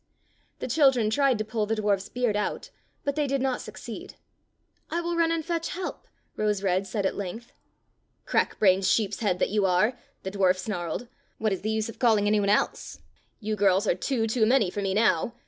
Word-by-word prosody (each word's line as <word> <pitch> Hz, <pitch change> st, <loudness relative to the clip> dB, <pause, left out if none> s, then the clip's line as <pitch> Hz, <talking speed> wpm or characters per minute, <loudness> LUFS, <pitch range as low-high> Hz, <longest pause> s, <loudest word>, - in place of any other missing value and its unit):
'' -, -, -40 dB
The -, -, -2 dB
children 255 Hz, -4 st, +3 dB
tried 275 Hz, 0 st, +3 dB
to 215 Hz, -, -3 dB
pull 220 Hz, -1 st, -2 dB
the 225 Hz, -, 0 dB
dwarf's 205 Hz, -2 st, 0 dB
beard 245 Hz, -4 st, 0 dB
out, 210 Hz, -, -3 dB, 0.3 s
but 280 Hz, -1 st, -1 dB
they 300 Hz, -2 st, 0 dB
did 275 Hz, 0 st, 0 dB
not 260 Hz, -1 st, -1 dB
succeed. -, -, -9 dB, 0.7 s
"I 340 Hz, -, -1 dB
will 345 Hz, 0 st, -2 dB
run 335 Hz, -1 st, +2 dB
and 330 Hz, -2 st, -1 dB
fetch 335 Hz, -1 st, -2 dB
help," 370 Hz, +1 st, -6 dB, 0.3 s
Rose 210 Hz, -2 st, 0 dB
red 190 Hz, 0 st, +1 dB
said 205 Hz, -2 st, -2 dB
at -, -, +1 dB
length. 215 Hz, +5 st, -6 dB, 0.4 s
" -, -, -46 dB
Crack -, -, 0 dB
brained 190 Hz, -2 st, +4 dB
sheepshead 205 Hz, -2 st, +1 dB
that -, -, 0 dB
you 210 Hz, -1 st, +1 dB
are! 185 Hz, +6 st, +3 dB, 0.2 s
" -, -, -41 dB
the 190 Hz, -, -4 dB
dwarf 190 Hz, -2 st, +2 dB
snarled. 185 Hz, +2 st, -4 dB, 0.3 s
"What 215 Hz, -2 st, 0 dB
is 190 Hz, -, -4 dB
the 215 Hz, -, -2 dB
use 220 Hz, 0 st, 0 dB
of 230 Hz, -, -10 dB
call 230 Hz, -3 st, +4 dB
ing 205 Hz, -, 0 dB
any 210 Hz, 0 st, +3 dB
one 200 Hz, -1 st, +1 dB
else.^ 210 Hz, -, 0 dB, 0.4 s
You 215 Hz, 0 st, -2 dB
girls 200 Hz, 0 st, +3 dB
are -, -, +3 dB
two 250 Hz, -5 st, -1 dB
too 220 Hz, 0 st, +2 dB
many 235 Hz, -7 st, +3 dB
for 205 Hz, -, -3 dB
me 195 Hz, -1 st, -1 dB
now. 215 Hz, +1 st, +2 dB
215 Hz, 215 wpm, -26 LUFS, 195-250 Hz, 0.7 s, brained